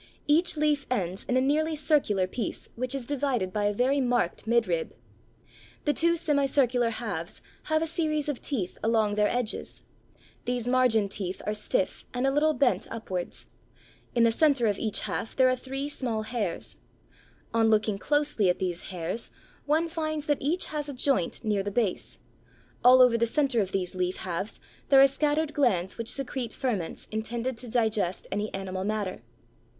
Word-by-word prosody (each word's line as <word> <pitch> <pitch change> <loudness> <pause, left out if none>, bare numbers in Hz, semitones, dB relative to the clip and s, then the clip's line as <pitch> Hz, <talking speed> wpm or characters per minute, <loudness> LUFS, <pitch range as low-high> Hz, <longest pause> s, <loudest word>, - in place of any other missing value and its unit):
Each 320 +3 +3
leaf 295 -2 +1
ends 190 -6 -2
in 255 - +3
a - - +4
nearly 310 +4 +1
circular 280 - +2
piece 210 +4 -5
which 255 +3 -1
is 265 -3 -4
divided 255 -8 -1
by 210 -1 0
a 205 - +3
very 260 +6 +1
marked 240 -6 0
midrib. 215 -9 +1 0.9
The 295 - +3
two 335 +2 +3
semicircular 275 -6 +2
halves 200 -6 -5 0.3
have 315 0 +1
a - - +1
series 310 -2 -1
of 290 -4 -3
teeth 210 - -2
along 220 -2 +2
their 210 0 +3
edges; 245 -1 -3 0.6
these 245 -1 -2
margin 245 -5 +3
teeth 195 -2 -4
are 210 - 0
stiff 215 - -1
and 250 +2 0
a 270 - +3
little 300 +2 +2
bent 270 -4 +2
upwards. 190 -6 -5 0.7
In 235 - +4
the 230 - +5
centre 280 -1 +3
of 205 -2 +1
each 215 -2 0
half 225 - -4
there 260 -1 +5
are 255 - +2
three 270 +2 -5
small 240 -6 -2
hairs. 215 -6 -3 0.8
On 225 -1 +3
looking 215 -2 +2
closely 290 -9 +1
at 180 - +2
these 175 -2 -3
hairs 180 +5 -4 0.4
one 315 +3 +2
finds 310 -2 -3
that 290 -2 0
each 320 +7 +1
has 295 -1 -3
a - - -4
joint 255 -8 0
near 210 -3 +1
the 200 - -3
base; 205 -2 -1 0.7
all 255 +1 +8
over 235 -2 +4
the 235 - +3
centre 270 -2 +2
of 190 -2 -3
these 185 -2 -2
leaf 185 0 -1
halves 185 +3 -4 0.3
there 275 - +7
are 270 - +9
scattered 295 +2 +1
glands 195 -9 +1
which 230 - +2
secrete 260 -3 0
ferments 220 -11 -3
intended 230 +3 -3
to 245 - -7
digest 220 -6 0
any 205 +2 -2
animal 190 -1 -4
matter. 205 - -2
240 Hz, 175 wpm, -27 LUFS, 205-280 Hz, 0.9 s, are